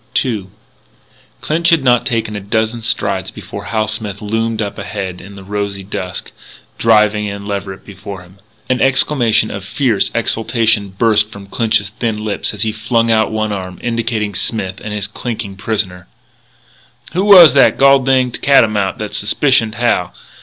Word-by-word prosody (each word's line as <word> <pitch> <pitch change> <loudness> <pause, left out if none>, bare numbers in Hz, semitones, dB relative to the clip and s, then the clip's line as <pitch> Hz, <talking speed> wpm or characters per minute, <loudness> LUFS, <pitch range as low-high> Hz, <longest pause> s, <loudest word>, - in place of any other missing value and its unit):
II 110 -7 -3 0.9
Clinch 165 +2 +1
had 165 -5 +3
not 125 -2 +3
taken 115 -3 -2
a - - -3
dozen 110 +3 -1
strides 100 -4 0
before - - -9
Hal 110 -1 -1
Smith 105 -2 -4
loomed 115 +1 -2
up 105 -1 -4
ahead 95 -3 -5
in 100 +1 -12
the 100 - -11
rosy 100 0 -4
dusk, 95 -1 -5 0.5
driving 105 -2 +3
in 100 0 -6
Leverett 100 -2 -5
before 100 -1 -9
him. 90 +2 -19 0.3
An 130 -1 0
exclamation 125 -5 +2
of 100 - -6
fierce 110 0 0
exultation 110 -2 +1
burst 105 +1 +2
from 100 -2 -11
Clinch's 105 -1 0
thin 110 -1 -3
lips 105 -2 -1
as 105 -1 -3
he 110 - 0
flung 115 +1 0
out 110 -1 +2
one 110 -1 -2
arm, 95 -2 -5
indicating 115 -3 -2
Smith 95 -1 -3
and 105 - -5
his 105 -2 -2
clinking 105 -1 -5
prisoner: 95 -4 -3 1.1
"Who 185 +3 0
was 180 -8 +9
that 140 - +4
gol 140 0 +6
dinged 130 -2 0
catamount 110 -8 +3
that 105 -1 -6
suspicioned 110 +3 +1
Hal? 90 -7 0
110 Hz, 160 wpm, -16 LUFS, 100-115 Hz, 1.1 s, was